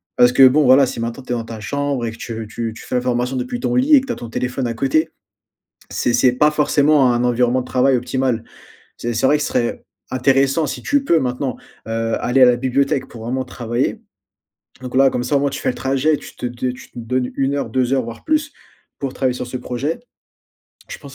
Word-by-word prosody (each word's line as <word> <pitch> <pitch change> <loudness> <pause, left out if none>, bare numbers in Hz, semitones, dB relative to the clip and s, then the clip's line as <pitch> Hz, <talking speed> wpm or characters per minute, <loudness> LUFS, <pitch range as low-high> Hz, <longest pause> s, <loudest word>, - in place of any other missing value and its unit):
Parce 125 0 +5
que, 135 - +8
bon, 145 +4 +4
voilà, 130 +2 +6
si 125 - -5
maintenant, 115 +3 -4
tu - - -8
es - - 0
dans 115 - -4
ta 115 -1 -8
chambre 140 +2 -2
et 115 - -3
que 115 - -12
tu 115 -2 -6
tu 115 -1 -4
tu - - -11
fais - - -4
la 125 - +2
formation 125 +1 -1
depuis 130 - -3
ton 245 0 -1
lit 270 +5 +5
et 275 - +6
que 265 - -10
tu 245 - -1
as - - -6
ton 120 - -8
téléphone 125 +2 -2
à 115 - -2
côté, 140 +6 +1 0.8
c'est 120 - 0
c'est 125 +1 +4
pas 150 +5 +3
forcément 150 -3 +3
un 120 0 0
environnement 125 +1 +2
de 125 - -7
travail 130 +1 +2
optimal, 125 -1 -1 0.5
c'est 120 0 -3
c'est 115 - +2
vrai 150 - +4
que - - -2
ce - - -1
serait 120 -1 -1 0.3
intéressant 135 +4 +2
si - - -5
tu 285 -1 +1
peux 170 -11 +3
maintenant, 125 -2 -2 0.3
heu, 115 0 -1
aller 130 +2 +3
à - - +11
la 125 -1 +5
bibliothèque 135 +2 0
pour 115 -2 -11
vraiment 130 +2 -2
travailler. 120 0 -2 0.8
Donc, 130 0 -6
là, 135 0 +5
comme 120 - -2
ça, 140 +3 +1
au - - +2
moins, 140 0 +1
tu 140 - -5
fais - - -1
le - - -5
trajet 135 +3 +1
tu - - -12
te - - -4
de 125 +1 -3
tu 125 - -11
te - - -12
donnes 125 +2 -2
1 135 +1 0
heure, 140 - -2
2 130 -1 0
heures 135 -1 +2
voire 115 0 -9
plus 305 -1 0 0.5
pour 135 -2 -3
travailler 130 -2 0
sur 125 - -5
ce 125 - -5
projet. 135 - -3 0.9
Je - - -7
pense 140 -2 -12
130 Hz, 245 wpm, -19 LUFS, 120-140 Hz, 0.9 s, à